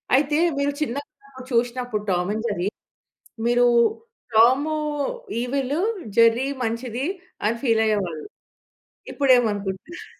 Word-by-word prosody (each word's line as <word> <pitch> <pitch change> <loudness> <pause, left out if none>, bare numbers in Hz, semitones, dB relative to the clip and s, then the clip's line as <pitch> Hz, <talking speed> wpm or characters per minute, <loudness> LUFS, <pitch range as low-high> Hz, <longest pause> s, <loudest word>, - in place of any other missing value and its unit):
అయితే 295 +2 +2 0.2
మీరు 280 0 +1
చిన్నప్పుడు 275 -1 -6
చూసినప్పుడు 240 -2 -1
'టామ్ 180 +1 0
అండ్ 220 +1 -3
జెర్రీ' 200 -2 -1 0.8
మీరు 240 +1 +4 0.7
టామ్ 260 +7 +5 0.7
ఈవిల్ 270 +2 -1 0.4
జెర్రీ 230 +3 +5 0.2
మంచిది 235 +3 -3 0.4
అని 230 +2 +1
ఫీల్ 225 -3 +3
అయ్యేవాళ్ళు. 185 -8 -1 0.9
ఇప్పుడు 275 -2 +1
ఏమి 240 -2 +2
అనుకుంటున్నారు? 205 - -6
240 Hz, 105 wpm, -23 LUFS, 215-270 Hz, 0.9 s, టామ్